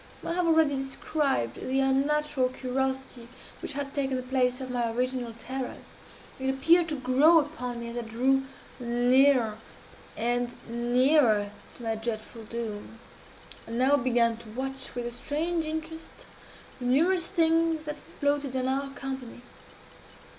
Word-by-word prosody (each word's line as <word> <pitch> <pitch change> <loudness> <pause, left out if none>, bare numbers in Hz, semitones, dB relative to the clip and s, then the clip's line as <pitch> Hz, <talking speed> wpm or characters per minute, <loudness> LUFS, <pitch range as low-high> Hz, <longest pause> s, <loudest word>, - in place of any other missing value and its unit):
I - - -1
have 355 0 +1
already 320 -3 +4
described 270 - -1
the 265 +1 -1
unnatural 270 0 +2
curiosity 260 -1 -3 0.3
which - - -4
had 275 0 -4
taken 270 -2 0
the 255 - -4
place 250 0 +1
of 260 -1 -5
my 240 -2 0
original 250 0 -1
terrors. 260 +2 -6 0.5
It 265 0 -1
appeared 330 +6 +4
to 305 - -1
grow 270 +5 +5
upon 250 -6 -1
me 235 - -5
as 235 - -6
I - - -1
drew 250 +4 +1 0.4
nearer 245 -1 +3 0.6
and 240 +1 0
nearer 240 -2 +3 0.3
to 240 - -11
my 225 -1 0
dreadful 225 0 -5
doom. 225 -1 -6 0.7
I - - -8
now 260 +4 +4
began 235 -3 +2
to 225 -1 -12
watch, 265 +3 -5
with 245 -1 -3
a 240 - -3
strange 315 +7 -2
interest, 320 +1 -6 0.5
the 250 - -5
numerous 335 +8 +3
things 330 -2 +2
that 300 0 -4 0.2
floated 285 -2 0
in 255 0 0
our 275 +1 -1
company. 265 -3 -6
260 Hz, 145 wpm, -28 LUFS, 240-285 Hz, 0.7 s, grow